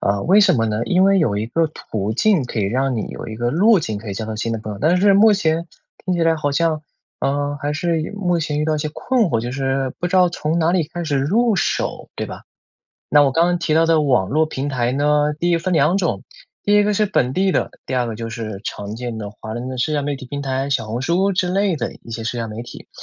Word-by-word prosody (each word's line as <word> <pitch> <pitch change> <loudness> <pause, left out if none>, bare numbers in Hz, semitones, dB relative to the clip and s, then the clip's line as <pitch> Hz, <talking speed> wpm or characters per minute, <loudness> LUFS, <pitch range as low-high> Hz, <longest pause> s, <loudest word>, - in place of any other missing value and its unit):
呃， 100 0 0
为 195 +4 +5
什 195 -5 +5
么 115 -2 +1
呢？ 110 +1 -1
因 185 +6 +3
为 195 0 +4
有 110 - +1
一 105 - -2
个 160 +8 +1
途 110 -7 -4
径 185 - +2
可 120 - -5
以 105 - +1
让 130 +5 0
你 110 - -2
有 - - -7
一 110 - -6
个 120 +1 -1
路 200 - +4
径 110 -9 -3
可 110 - -9
以 100 - -4
交 110 - -4
到 110 - -5
新 115 +1 -2
的 115 - -2
朋 105 0 -6
友， 100 - -8
但 170 +5 +3
是 200 +1 +5
目 215 +2 +6
前 165 -3 0 0.4
听 185 - 0
起 170 - 0
来 165 -1 +3
好 145 -2 -1
像， 155 0 +1 0.4
呃， 145 +1 -1
还 145 +1 -2
是 165 0 0
有 160 +6 -5
目 180 -4 0
前 150 -2 -2
遇 - - 0
到 155 0 +1
一 - - -3
些 155 - -2
困 250 +3 +1
惑， 120 - 0
就 120 +2 -4
是 135 -1 -1
不 175 - -1
知 185 - +1
道 180 -1 +5
从 160 0 -1
哪 165 +1 +2
里 170 -5 +1
开 175 0 -5
始 145 -3 0
入 215 - +2
手， - - -1
对 - - -3
吧？ - - -9 0.7
那 145 - +6
我 135 - +2
刚 165 +5 +3
刚 175 0 +1
提 170 -2 -1
到 165 +1 +4
的 165 -1 +3
网 125 -10 +2
络 155 +3 +2
平 145 -2 -4
台 125 -3 0
呢， 150 +2 +2
第 175 +1 +1
一 170 - +3
分 180 +2 -2
两 155 +5 +3
种。 160 - -1 0.4
第 205 - +3
一 205 - +5
个 210 0 +1
是 210 +1 +2
本 130 -10 +1
地 190 +4 +1
的， - - 0
第 130 - -3
二 125 -1 +1
个 115 - -4
就 115 +1 -5
是 110 -3 -5
常 105 +2 -5
见 120 -2 -5
的 105 -1 -6
华 110 +1 -8
人 120 +2 -5
的 130 - -5
社 150 +5 0
交 145 - +1
媒 140 -1 -2
体 130 - -10
平 140 +2 -5
台， 135 0 -2
小 120 -5 0
红 115 +3 -4
书 180 +7 +1
之 180 -1 0
类 190 -2 +1
的 115 - -3
一 115 - -11
些 115 0 -5
社 120 +1 -2
交 115 -1 -3
媒 110 +2 -6
体。 120 - -11
145 Hz, 305 characters per minute, -20 LUFS, 120-175 Hz, 0.7 s, 目